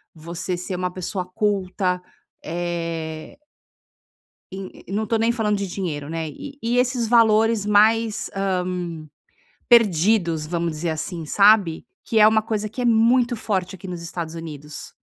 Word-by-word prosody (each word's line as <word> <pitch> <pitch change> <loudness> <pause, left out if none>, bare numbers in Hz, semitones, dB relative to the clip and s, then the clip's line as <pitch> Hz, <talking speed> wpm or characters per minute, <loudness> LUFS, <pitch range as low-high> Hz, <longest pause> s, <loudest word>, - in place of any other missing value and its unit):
você 170 +3 -4
ser 180 +1 -4
uma 180 0 -2
pessoa 185 0 -4
culta", 185 -1 -1 0.4
eh 165 - -4 1.1
en 190 0 -6
e - - -16
e 195 - -7
não 215 +1 -1
tô 225 - +1
nem 230 +1 +2
falando 215 -3 0
de 200 - -2
dinheiro, 165 -6 -4
né, 165 0 -3
e 285 - -9
e 240 +2 +1
esses 250 -2 +1
valores 225 -2 +4
mais, 215 +1 +3
hã, 195 0 -1 1.2
perdidos, 185 -7 +3
vamos 170 +1 -2
dizer 155 +2 -3
assim, 160 +1 -4
sabe? 200 -1 +4 0.2
Que 225 - +1
é 210 - +8
uma 220 0 +4
coisa 215 -1 -3
que 250 +4 -6
é - - 0
muito 235 +1 +3
forte 190 -4 -2
aqui 190 +1 -10
nos 175 -2 -6
Estados 170 -1 -5
Unidos. 150 -3 -8
190 Hz, 155 wpm, -22 LUFS, 170-220 Hz, 1.2 s, é